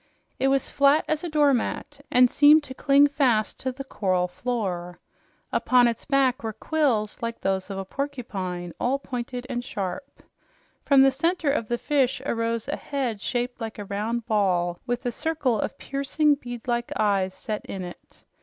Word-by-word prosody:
It 270 - +2
was 270 0 +2
flat 280 +2 +4
as 310 +1 -1
a 345 - -3
doormat 285 -1 0
and 250 0 +6
seemed 295 +4 +6
to 260 - -5
cling 280 +2 +5
fast 265 -7 +1
to 260 - -2
the 270 +2 -7
coral 185 -8 0
floor. 180 -4 -3 0.5
Upon 250 -1 +4
its 230 -2 -3
back 270 -3 +2
were 220 -1 -4
quills 230 -4 0
like 230 0 -3
those 190 0 -1
of 195 - -5
a 195 - -4
porcupine, 190 - -4
all 260 +3 +1
pointed 250 -2 -5
and 245 -2 -3
sharp. 205 +5 -6 0.6
From 275 -2 +6
the 270 - +5
center 325 +2 0
of 235 -6 -1
the 240 - -1
fish 270 -2 +1
arose 230 -2 -1
a 290 - -2
head 255 -7 -3
shaped 245 +1 -2
like 225 -1 -5
a 205 - -6
round 215 +4 -2
ball, 180 -6 +1
with 245 +1 -2
a 245 - 0
circle 290 -4 0
of - - -3
piercing, 280 +2 +1
bead 245 -4 -7
like 240 -1 -1
eyes 195 -3 +1
set 215 -2 -5
in 190 -1 -5
it. 175 0 -12
245 Hz, 175 wpm, -25 LUFS, 210-275 Hz, 0.6 s, and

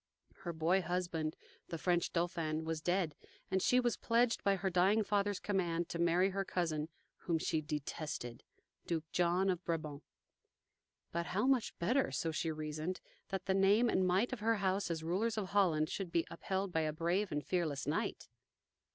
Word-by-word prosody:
Her 175 - -5
boy 170 +4 +2
husband, 170 -3 -2 0.3
the 165 - -4
French 175 +1 +1
Dauphin, 165 -2 -1
was 160 -1 -2
dead, 175 -2 +1 0.4
and 190 - +2
she 250 - +4
was 240 -2 +1
pledged 230 0 +2
by 200 0 +4
her 190 0 -1
dying 190 +5 +4
father's 205 -1 +1
command 175 -4 -1
to 170 - -4
marry 175 +3 +3
her 195 +1 -1
cousin, 160 -5 -1 0.3
whom 170 -2 0
she 160 0 0
detested, 150 -5 -4 0.4
Duke 165 -2 -1
John 180 +2 +2
of 180 -2 0
Brabant. 155 -4 -3 1.1
But 170 0 -2
how 210 +6 0
much 260 -3 +2
better, 245 +10 +2
so 165 - -1
she 160 +1 -1
reasoned, 155 +3 -3 0.3
that 190 -1 -3
the 190 - +2
name 200 +5 +4
and 185 - +2
might 195 +8 +2
of 255 - -3
her 225 +2 +2
house 195 -1 0
as 160 -1 -2
rulers 205 +7 0
of 200 -3 -2
Holland 170 -7 +3
should 185 +1 -4
be 170 - +2
upheld 190 +3 -2
by 160 - +1
a 155 -1 0
brave 175 +6 0
and 150 0 -2
fearless 160 -6 -1
knight. - - -2
175 Hz, 175 wpm, -35 LUFS, 160-195 Hz, 1.1 s, she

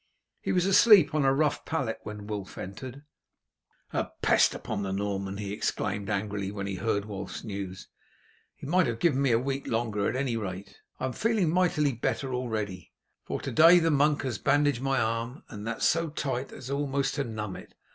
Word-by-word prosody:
He - - -1
was 180 -1 +2
asleep 195 -1 +7
on 150 -2 +2
a 135 - +5
rough 145 +2 +1
pallet 135 -9 -2
when 105 -1 -7
Wulf 105 -2 -6
entered. 125 +9 -7 0.9
"A - - -1
pest - - +4
upon 105 -2 -4
the 95 -1 -3
Norman!" 100 0 -2
he 100 -1 -4
exclaimed 100 0 -2
angrily 100 -1 -2
when 100 -1 -4
he 100 - -3
heard 100 +1 -1
Wulf's 100 -2 -6
news. 100 -3 -6 0.7
"He - - -11
might 175 +2 +3
have 115 -1 -2
given 140 -1 +2
me 140 - +3
a 115 - +4
week 135 +3 -3
longer 110 -3 0
at 120 - -3
any 130 -3 0
rate. 95 -2 -6 0.2
I - - -1
am 130 - -2
feeling 215 - +1
mightily 165 -5 +2
better 130 +3 -2
already, 110 -8 -3 0.3
for - - -3
to - - -4
day 165 +3 +8
the 165 -1 +3
monk 145 +1 +3
has 130 -4 -3
bandaged 145 -2 +2
my 135 -1 +1
arm, 115 +4 -2
and 105 -1 -7
that 115 - -3
so 165 0 +2
tight 135 -3 -3
as 130 +1 -8
almost 140 -1 0
to 145 - -1
numb 110 -5 -5
it. - - -12
120 Hz, 195 wpm, -28 LUFS, 105-145 Hz, 0.9 s, day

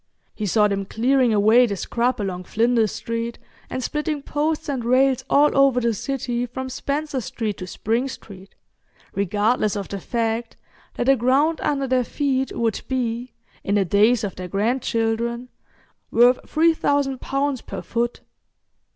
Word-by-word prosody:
He 215 - -3
saw 210 +2 +4
them 200 -1 -2
clearing 250 +4 +2
away 220 +4 +5
the 200 - -2
scrub 240 +6 -1
along 185 -3 -3
Flinders 225 0 +2
Street, 230 0 -4 0.3
and 255 - -4
splitting 300 +1 -2
posts 300 +2 -1
and 270 -4 -2
rails 255 +2 +3
all 295 +1 +4
over 275 -2 +4
the 235 -1 +1
city 245 +1 -2
from 260 +2 -6
Spencer 280 +1 -3
Street 215 -2 -4
to 185 - -7
Spring 230 +7 -1
Street, 195 -6 -11 0.6
regardless 210 +3 +1
of 200 -2 -4
the 200 - -4
fact 230 +2 -2 0.4
that - - -1
the 270 +2 +5
ground 275 +6 +2
under 275 -2 0
their 255 -1 +2
feet 265 0 -1
would 225 -2 0
be, 245 -1 -2 0.3
in 200 - 0
the 200 -2 +3
days 215 +6 +3
of 200 - -3
their 180 0 -5
grandchildren, 230 +3 -1 0.6
worth 245 +2 +4
3,000 285 -4 +2
pounds 275 -1 -1
per - - -7
foot. 235 +1 -2
240 Hz, 150 wpm, -22 LUFS, 220-270 Hz, 0.6 s, away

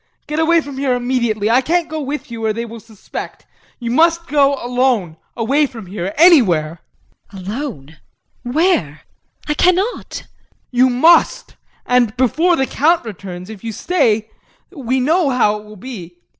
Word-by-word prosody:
Get 300 +1 -3
away 330 +1 +3
from 280 -2 -8
here 265 -2 +1
immediately. 240 -4 -1
I 250 +3 +4
can't 340 +5 0
go 310 0 -5
with 285 -2 -5
you 230 -1 -6
or 215 - +1
they 230 +2 -4
will 230 0 -9
suspect. 220 -2 -9 0.3
You 235 -2 -4
must 330 +5 +3
go 280 -2 +2
alone 245 -9 0 0.2
away 275 +6 +2
from 230 -6 -10
here 185 0 -5
anywhere. 180 - +4 0.5
JULIE. 190 -3 -10
Alone? 200 - -6 0.4
Where? 245 - 0 0.5
I 300 - +1
cannot. 365 +9 +1
JEAN. - - -24 0.5
You 255 +1 +4
must 330 - +3 0.3
and 245 -3 +1
before 320 +8 +2
the 265 - 0
Count 320 +3 +1
returns. 190 -2 -8
If 215 -2 -11
you 230 - -4
stay, 220 - 0 0.4
we 265 -6 -2
know 310 +4 +2
how 215 -5 +1
it 210 - -15
will 210 0 -13
be. 185 -6 -9
250 Hz, 160 wpm, -17 LUFS, 215-300 Hz, 0.5 s, I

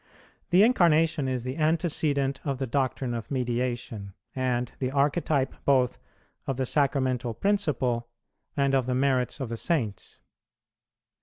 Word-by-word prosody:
The 180 +4 +6
Incarnation 165 - +3
is 130 -2 -2
the 130 +3 -4
antecedent 155 -4 +1
of 140 -3 -2
the 135 - -2
doctrine 130 -1 -1
of 115 -2 -5
Mediation, 120 -6 -3 0.2
and 125 -2 -1
the 130 - 0
archetype 140 0 +1
both 130 -3 +2 0.5
of 135 - -1
the 130 - 0
Sacramental 130 -4 0
principle 130 - 0 0.5
and 140 -1 +2
of 130 -2 +2
the 125 - 0
merits 130 0 +1
of 120 -4 -3
Saints. 115 - -2
130 Hz, 130 wpm, -27 LUFS, 125-145 Hz, 0.5 s, The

